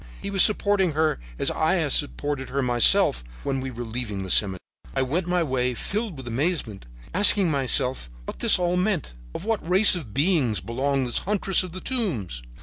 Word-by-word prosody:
He 200 - -6
was 195 -2 +3
supporting 200 -5 +2
her 155 - 0 0.2
as - - -1
I - - 0
had - - -1
supported 135 - -1
her 140 +1 -2
myself 120 - +3 0.2
when 135 -1 -2
we 130 - -5
were 120 -1 -7
leaving 110 -4 -5
the 95 - -4
cemetery. 95 -3 +3 0.4
"I - - +1
went 165 +7 -2
my 180 -1 0
way, 125 -4 -1
filled 210 - -4
with 130 -2 -10
amazement, 120 - -3 0.3
asking 195 -2 +6
myself 130 - 0 0.2
what - - -8
this - - +5
all 180 0 -1
meant, 180 - -2 0.3
to - - -10
what 215 -7 -3
race 190 +4 +6
of 150 -12 -7
beings 140 - 0
belonged 135 +3 -2
this 120 - -2
huntress 195 -1 -1
of 180 -3 -8
the 185 - -7
tombs? 135 - -3
140 Hz, 190 wpm, -24 LUFS, 120-185 Hz, 0.4 s, asking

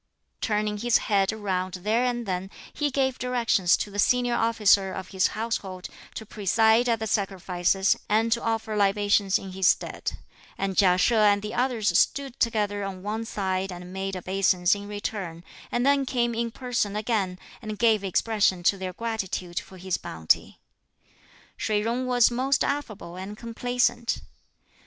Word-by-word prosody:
Turning 210 -1 0
his 240 +2 +3
head 195 -1 +1
round 190 -4 -2
there 215 +6 0
and 240 -1 -1
then, 185 -1 -3 0.2
he 295 -1 0
gave 265 -1 0
directions 235 -7 +2
to 205 - -4
the 205 - -5
senior 245 +3 +3
officer 210 -4 +3
of 185 -1 -6
his 190 -2 +2
household 195 -5 -3 0.3
to 220 - -6
preside 220 +4 +2
at 230 - +2
the 220 - -4
sacrifices 195 -2 +1
and 220 +2 +2
to 235 +1 +2
offer 225 -1 -2
libations 205 -1 +2
in 195 - -8
his 190 0 +1
stead; - - 0 0.4
and 195 -1 -2
Chia 180 -2 +4
She 235 - +3
and 205 -2 +4
the 210 - -5
others 235 -7 0
stood 275 +4 +1
together 210 -3 0
on 190 -2 -6
one 220 +2 -3
side 190 -3 -2
and 180 0 -9
made 190 0 -3
obeisance 185 -1 +2
in 205 0 -5
return, 200 -5 -5 0.3
and 240 +1 0
then 280 -1 +3
came 240 -2 0
in 230 +1 -1
person 240 -4 -2
again 210 -4 -1 0.2
and 215 -1 -6
gave 220 -2 +3
expression 195 -1 +1
to 195 +2 +3
their 185 -1 -4
gratitude 190 -5 -3
for 190 - -13
his 185 0 -2
bounty. 80 -1 -1 1.0
Shih 210 -1 0
Jung 240 +3 -1
was 245 -1 +4
most 265 +3 +1
affable 215 -11 -4
and 195 +3 -7
complaisant. 240 +1 -1
210 Hz, 160 wpm, -26 LUFS, 190-230 Hz, 1.0 s, Chia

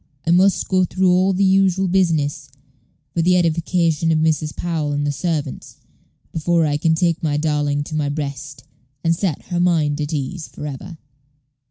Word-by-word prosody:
"I 165 - +1
must 185 +3 +3
go 185 -1 +2
through 185 +1 +1
all 185 +2 +3
the 190 +1 +1
usual 190 0 +3
business, 160 -6 0 0.6
for 170 - 0
the 180 +2 +3
edification 165 -1 +1
of 160 - +2
Mrs. 155 -1 0
Powell 160 -4 -2
and 145 0 -1
the 145 - 0
servants, 145 -1 -4 0.6
before 165 +1 +1
I 145 -1 0
can 160 +1 +2
take 170 0 0
my 150 -2 0
darling 145 -1 0
to 155 - -7
my 150 -2 0
breast, 145 -2 -5 0.4
and 165 0 +2
set 170 -4 -2
her 175 - -1
mind 155 -4 +1
at 145 +1 -3
ease 155 +3 -4
for - - -9
ever." 155 +4 -7
160 Hz, 175 wpm, -20 LUFS, 145-180 Hz, 0.6 s, must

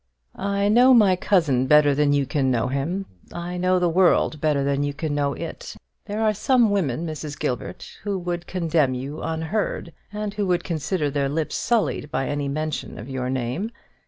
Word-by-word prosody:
"I 200 0 0
know 250 +4 +6
my 205 -5 +5
cousin 160 -10 +2
better 150 0 +6
than 145 +1 +2
you 140 -1 +2
can 135 0 0
know 120 -1 +1
him; 160 +9 -2 0.3
I 175 +1 -5
know 185 +1 +2
the 180 -1 +2
world 170 -3 +3
better 150 -3 +2
than 140 0 0
you 145 0 -2
can 155 0 -3
know 145 -1 0
it. - - -7 0.3
There 210 +2 -2
are 215 -1 +3
some 235 +1 +3
women, 165 -6 0
Mrs. 155 -2 -5
Gilbert, 125 -1 -4
who 200 -1 -2
would 175 -1 -4
condemn 160 -7 +1
you 135 +4 -5
unheard, 165 +1 -2 0.2
and 210 -1 -4
who 205 -2 -1
would 175 -1 +1
consider 160 -2 -1
their 140 -1 0
lips 155 +2 -2
sullied 225 -10 0
by 135 -3 -1
any 145 -1 -2
mention 155 +1 -3
of 115 +6 -8
your 130 -1 -2
name. 130 - -2
155 Hz, 190 wpm, -23 LUFS, 140-190 Hz, 0.3 s, know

